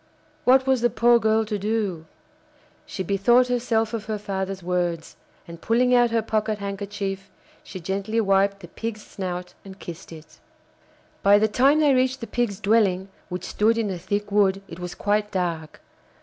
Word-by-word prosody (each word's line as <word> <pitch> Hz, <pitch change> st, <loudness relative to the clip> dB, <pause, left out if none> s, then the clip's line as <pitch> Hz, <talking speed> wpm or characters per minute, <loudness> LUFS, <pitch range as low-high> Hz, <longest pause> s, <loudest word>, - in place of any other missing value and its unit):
What 260 Hz, +1 st, +5 dB
was 265 Hz, -2 st, +2 dB
the 240 Hz, -, +3 dB
poor 235 Hz, +1 st, +4 dB
girl 220 Hz, 0 st, +2 dB
to 210 Hz, -1 st, -3 dB
do? 200 Hz, -6 st, -2 dB, 0.8 s
She 190 Hz, -, -4 dB
bethought 240 Hz, +7 st, +3 dB
herself 235 Hz, -2 st, 0 dB
of 220 Hz, -2 st, -4 dB
her 215 Hz, -1 st, -3 dB
father's 195 Hz, -2 st, -4 dB
words, 175 Hz, -2 st, -2 dB, 0.3 s
and, 170 Hz, 0 st, -10 dB
pulling 250 Hz, +2 st, +2 dB
out 240 Hz, -1 st, +5 dB
her 230 Hz, -1 st, 0 dB
pocket 215 Hz, 0 st, -1 dB
handkerchief, 200 Hz, -1 st, -5 dB, 0.3 s
she 185 Hz, -, -8 dB
gently 195 Hz, +5 st, -2 dB
wiped 195 Hz, -1 st, +2 dB
the 175 Hz, -, -10 dB
Pig's 215 Hz, +4 st, -6 dB
snout 180 Hz, -2 st, -6 dB
and 195 Hz, -1 st, -11 dB
kissed 170 Hz, -1 st, -10 dB
it. 160 Hz, -1 st, -13 dB, 0.8 s
By 200 Hz, +1 st, +6 dB
the 215 Hz, +1 st, +3 dB
time 270 Hz, +7 st, +3 dB
they 290 Hz, -2 st, +4 dB
reached 260 Hz, +1 st, +1 dB
the 230 Hz, -, -5 dB
Pig's 230 Hz, -5 st, -2 dB
dwelling, 195 Hz, -3 st, +2 dB, 0.2 s
which 180 Hz, 0 st, -5 dB
stood 225 Hz, +2 st, +1 dB
in 215 Hz, -3 st, -1 dB
a 180 Hz, -, -5 dB
thick 205 Hz, +3 st, -3 dB
wood, 195 Hz, -1 st, +2 dB
it -, -, -10 dB
was 180 Hz, 0 st, -6 dB
quite 210 Hz, 0 st, 0 dB
dark. 170 Hz, -5 st, -3 dB
205 Hz, 175 wpm, -24 LUFS, 190-225 Hz, 0.8 s, By